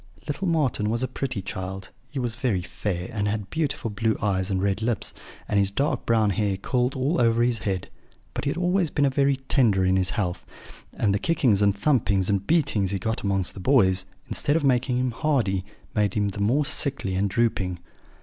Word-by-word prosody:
"Little 170 +6 -2
Marten 140 -10 +1
was 115 +3 0
a - - +1
pretty 130 -5 -3
child; 95 0 -6 0.2
he 145 - -8
was 120 -3 -1
very 120 -7 -1
fair, 90 0 -4
and 105 -2 -1
had 105 -2 -3
beautiful 145 -8 -2
blue 110 +1 0
eyes 95 -2 0
and 95 -1 0
red 100 +2 0
lips, 115 0 -1 0.3
and 100 - +2
his 100 -1 +2
dark 135 +5 -1
brown 110 -3 +3
hair 100 -2 0
curled 125 +5 0
all 140 +6 +1
over 115 0 +3
his 120 -2 +1
head; 95 -4 -2 0.5
but - - -4
he - - +1
had 145 - -2
always 180 -1 +1
been 145 -1 +2
very 140 0 +3
tender 105 -8 +3
in 95 0 +3
his 95 0 +1
health; 90 -6 -2 0.5
and 100 -2 0
the 100 - +1
kickings 130 - +2
and 100 -1 +3
thumpings 100 -7 +2
and 100 -1 -1
beatings 140 - +2
he 100 - -1
got 110 +4 -2
amongst 95 -2 -1
the - - -9
boys, 95 -6 +3 0.2
instead 145 - 0
of 165 - +1
making 125 -1 +2
him 125 0 0
hardy, 115 -9 0 0.3
made 105 -2 +1
him 105 -1 +1
the 100 +1 -5
more 130 +9 +2
sickly 140 -9 -1
and 100 +2 +1
drooping. 95 -5 0
110 Hz, 205 wpm, -25 LUFS, 100-130 Hz, 0.5 s, brown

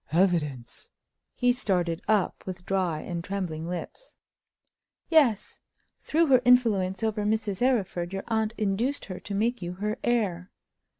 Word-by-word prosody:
"Evidence!" 155 -8 0 0.5
He 245 -1 +3
started 180 -8 0
up 210 -3 +1
with 180 -1 -6
dry 185 -5 0
and 170 -1 -5
trembling 175 -4 -4
lips. 180 - -7 0.9
"Yes. 280 - +3 0.4
Through 330 +2 +2
her 260 -4 +5
influence 225 -6 +3
over 215 -1 0
Mrs. 210 -1 -1
Arryford, 195 -9 0
your 195 0 -4
aunt 220 0 0
induced 220 +7 -1
her 185 -3 -7
to 200 - -6
make 235 +3 0
you 175 0 -4
her 210 +4 -3
heir. 195 -7 0
200 Hz, 135 wpm, -27 LUFS, 180-230 Hz, 0.9 s, her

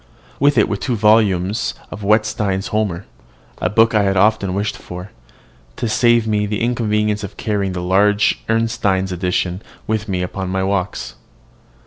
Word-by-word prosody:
With 145 0 +3
it 110 - +4
were 100 - -2
two 125 +3 -2
volumes 105 -2 +2
in - - -23
duodecimo - - -31
of 105 - -7
Wetstein's 105 -2 +1
"Homer," 100 -4 -1 0.5
a 90 - 0
book 115 +4 +3
I 105 - +4
had 95 -1 +1
often 100 -2 +2
wished 100 +1 -1
for, 90 +2 -9 0.6
to 120 - -2
save 120 +1 +3
me 105 -1 0
the 105 0 -3
inconvenience 105 -3 0
of 100 - -8
carrying 100 -3 -1
the 90 -1 -4
large 100 +3 +2
Ernestine 105 -4 0
edition 90 +1 -1 0.2
with 110 -1 -2
me 90 -2 -1
upon 95 +1 -4
my 95 0 -1
walks. 95 -1 -2
105 Hz, 165 wpm, -19 LUFS, 95-110 Hz, 0.6 s, it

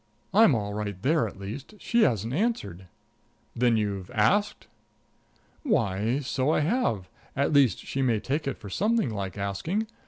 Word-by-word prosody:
"I'm 205 - +6
all 105 -2 -2
right 105 -2 -4
there, 155 - +2
at - - -10
least. 110 - -8
She 235 +3 +1
hasn't 115 - +1
answered." 120 - -2 0.7
"Then 120 -1 +3
you've 100 -3 -2
asked?" 205 - +2 1.0
"Why, 115 - 0
so 135 0 -1
I 155 - +2
have; 150 - 0 0.3
at 140 +3 +1
least 140 -5 +4
she 135 - -2
may 120 -5 +2
take 140 +7 -2
it 135 - -2
for 105 - -11
something 220 - +1
like 100 -2 -4
asking. 100 - -2
125 Hz, 155 wpm, -27 LUFS, 100-160 Hz, 1.0 s, I'm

